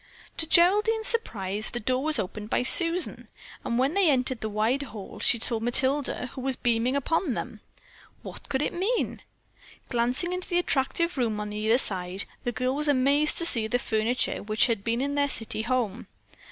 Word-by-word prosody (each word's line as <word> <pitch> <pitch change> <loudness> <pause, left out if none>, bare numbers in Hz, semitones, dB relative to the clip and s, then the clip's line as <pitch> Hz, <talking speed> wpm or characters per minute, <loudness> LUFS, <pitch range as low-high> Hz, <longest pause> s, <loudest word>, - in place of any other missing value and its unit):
To 325 - +2
Geraldine's 420 +7 +3
surprise, 215 - -1
the 240 - -4
door 255 +4 -1
was 310 -1 +1
opened 210 +1 -5
by - - 0
Susan, 335 +6 +4 0.4
and 235 - -2
when 265 +4 +1
they 390 -3 +3
entered 255 -3 +1
the 220 - -3
wide 220 +6 0
hall 215 -8 -9
she 235 - +3
saw 230 0 +1
Matilda, 260 +4 0
who 260 - -7
was 265 0 -1
beaming 240 +2 0
upon 280 0 -1
them. - - -6 0.6
What - - -11
could 280 0 -1
it - - -2
mean? 405 +8 -2 0.7
Glancing 250 +9 -1
into 365 0 -4
the 350 - 0
attractive 335 0 0
room 220 -4 -1
on 210 0 -5
either 215 +3 +1
side, 190 -4 0 0.2
the 245 - -1
girl 255 +2 -2
was 300 +1 -2
amazed 285 +2 +2
to 335 - +4
see 230 -9 +5
the 245 - 0
furniture 225 +1 0
which 215 +1 +2
had 225 -5 -2
been 230 +2 -1
in 285 +1 -2
their 285 0 0
city 225 -3 -3
home. 235 -3 -2
255 Hz, 185 wpm, -26 LUFS, 225-300 Hz, 0.7 s, see